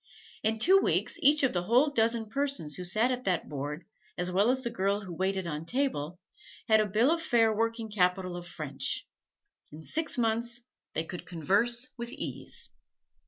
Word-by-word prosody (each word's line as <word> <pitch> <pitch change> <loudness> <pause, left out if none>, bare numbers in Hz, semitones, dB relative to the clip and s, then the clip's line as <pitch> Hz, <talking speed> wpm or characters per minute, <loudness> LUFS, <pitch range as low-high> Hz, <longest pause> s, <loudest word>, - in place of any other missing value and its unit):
In 220 +1 +1
two 370 - +6
weeks 340 - 0
each 295 -1 +5
of 265 - +3
the 175 - +1
whole 255 +8 +4
dozen 230 -3 +1
persons 275 - -1
who 180 - -3
sat 215 +8 +2
at 250 0 -2
that 180 -4 0
board, 150 +3 -5 0.3
as 180 0 -1
well 200 +5 +3
as 260 +1 +1
the 235 - -2
girl 200 -1 0
who 185 -4 -8
waited 190 +1 -1
on 155 -2 -4
table, 180 - -1 0.5
had 220 -2 +5
a 215 - +2
bill 220 +8 +3
of 335 0 +1
fare 230 -7 +3
working 230 +1 -1
capital 180 -2 +1
of 175 0 -7
French. 140 -5 -3 0.6
In 155 +2 -10
six 315 - -2
months 235 +1 0 0.3
they 160 - 0
could 175 +2 -8
converse 210 - +1
with 235 0 -5
ease. - - -6
220 Hz, 180 wpm, -29 LUFS, 180-240 Hz, 0.6 s, two